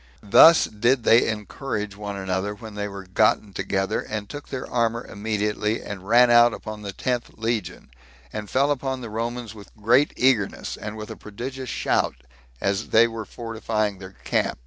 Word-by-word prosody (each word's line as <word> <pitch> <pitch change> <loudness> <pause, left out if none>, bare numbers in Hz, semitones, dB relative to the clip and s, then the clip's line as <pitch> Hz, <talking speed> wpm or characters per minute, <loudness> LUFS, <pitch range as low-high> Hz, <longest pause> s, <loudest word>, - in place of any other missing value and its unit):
Thus 160 +11 +7
did 120 +4 +1
they 115 +1 +5
encourage 105 -1 -4
one 100 -1 -6
another 95 +2 -2
when 110 +1 -10
they 105 0 -3
were 100 -1 -8
gotten 100 +1 +2
together, 95 0 -1
and 105 -1 -5
took 145 +4 -9
their 130 -2 -5
armor 115 0 0
immediately, 105 +1 -2
and 95 -2 -8
ran 120 +2 +6
out 120 0 +6
upon 110 0 -8
the 100 -1 -5
tenth 120 +3 -2
legion, 110 - -3 0.4
and 105 -1 -5
fell 140 +2 +2
upon 135 -2 -2
the 115 -3 -7
Romans 115 0 -4
with 105 -2 -13
great 120 +7 +4
eagerness, 125 -6 +1
and 105 +1 -7
with 110 0 -7
a - - -6
prodigious 125 +5 -7
shout, - - 0 0.4
as 100 +5 -1
they 115 +1 +6
were 115 -1 -6
fortifying 110 -3 -3
their 95 0 -11
camp. - - 0
110 Hz, 170 wpm, -24 LUFS, 105-120 Hz, 0.4 s, Thus